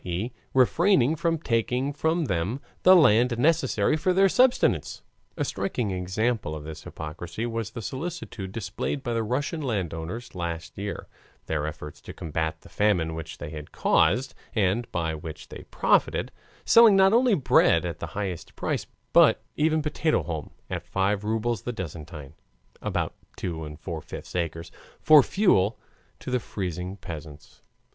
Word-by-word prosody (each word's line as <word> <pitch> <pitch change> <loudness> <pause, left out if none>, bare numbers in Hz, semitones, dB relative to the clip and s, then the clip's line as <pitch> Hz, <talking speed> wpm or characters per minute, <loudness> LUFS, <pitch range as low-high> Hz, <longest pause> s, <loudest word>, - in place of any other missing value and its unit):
e., 95 +7 -3 0.2
refraining 155 - +4
from 165 +1 0
taking 125 0 0
from 160 +3 0
them 95 +4 -1 0.2
the 185 +1 +8
land 125 - +5
necessary 160 +3 +2
for 180 +4 +1
their 195 +1 +5
subsistence. 250 +6 +2 0.3
(A - - 0
striking 120 - -2
example 95 0 -1
of 75 - -7
this 80 0 -9
hypocrisy 85 +7 -6
was 115 -2 -3
the 115 -2 -7
solicitude 130 - -5
displayed 110 +6 -3
by 120 - -2
the 115 - 0
Russian 135 +8 -2
landowners 100 - -3
last 85 -2 -5
year, 100 +1 -5 0.4
their 75 -1 -1
efforts 75 -1 -8
to - - -9
combat 80 0 -3
the - - -15
famine 90 -6 +1
which 80 -1 -7
they 75 +1 -7
had 75 -1 -8
caused, 120 +12 +2 0.2
and 110 +3 +1
by 80 -2 -1
which 80 0 -8
they - - -10
profited, - - +2 0.3
selling 230 -3 +7
not 195 +1 +5
only 240 -2 +5
bread 90 - +4
at 85 -3 -4
the 80 - -4
highest 95 -5 -4
price, - - -2 0.3
but - - +6
even 155 0 +2
potato 150 - +1
haulm 80 -2 -5 0.2
at - - -3
five 100 +2 0
rubles 110 0 -1
the 125 - -3
dessiatine 80 - -7 0.5
(about - - -2 0.2
2 80 -3 -4
and 75 0 -9
four 80 -1 -5
fifths - - -9
acres) 85 -1 -3 0.3
for 155 -2 +8
fuel 120 - +2 0.4
to - - -7
the 125 - +2
freezing 90 -3 -5
peasants.) 75 -5 -10
105 Hz, 155 wpm, -26 LUFS, 85-135 Hz, 0.5 s, the